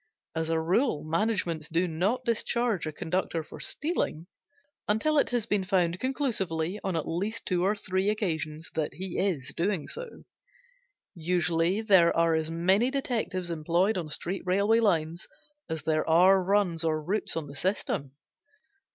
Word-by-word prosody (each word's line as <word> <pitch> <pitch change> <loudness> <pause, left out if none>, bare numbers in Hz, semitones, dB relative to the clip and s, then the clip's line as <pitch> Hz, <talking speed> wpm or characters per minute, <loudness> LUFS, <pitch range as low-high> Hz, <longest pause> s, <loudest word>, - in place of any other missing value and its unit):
As 160 0 -2
a 165 0 +1
rule 175 - +1
managements 165 -2 -1
do 170 +3 +1
not 195 +11 -1
discharge 230 -5 0
a - - -2
conductor 165 0 -2
for - - -12
stealing 295 - -1 0.6
until 290 +9 +2
it - - +2
has 240 -3 0
been 205 -4 0
found 185 -2 +1
conclusively, 205 - -1
on 190 -3 -1
at 160 - -2
least 200 +7 -3
two 180 -2 0
or 200 +3 +2
three 190 -1 -1
occasions, 160 -7 -2
that 155 -2 -2
he 185 -1 -4
is 170 -10 -1
doing 180 -2 -1
so. 480 -1 -5 0.9
Usually 175 +2 +1
there 190 -6 +5
are 165 0 +3
as 160 0 0
many 190 +8 +2
detectives 225 -10 -2
employed 170 +6 +1
on 170 -4 -3
street 180 +5 -2
railway 200 +5 +3
lines 170 -6 0 0.4
as 160 -2 -4
there 155 +1 0
are 185 +4 +6
runs 185 -4 +1
or 155 -1 +1
routes 180 +4 -1
on 160 - -2
the 140 - -10
system. 140 -5 -2
180 Hz, 155 wpm, -28 LUFS, 165-210 Hz, 0.9 s, are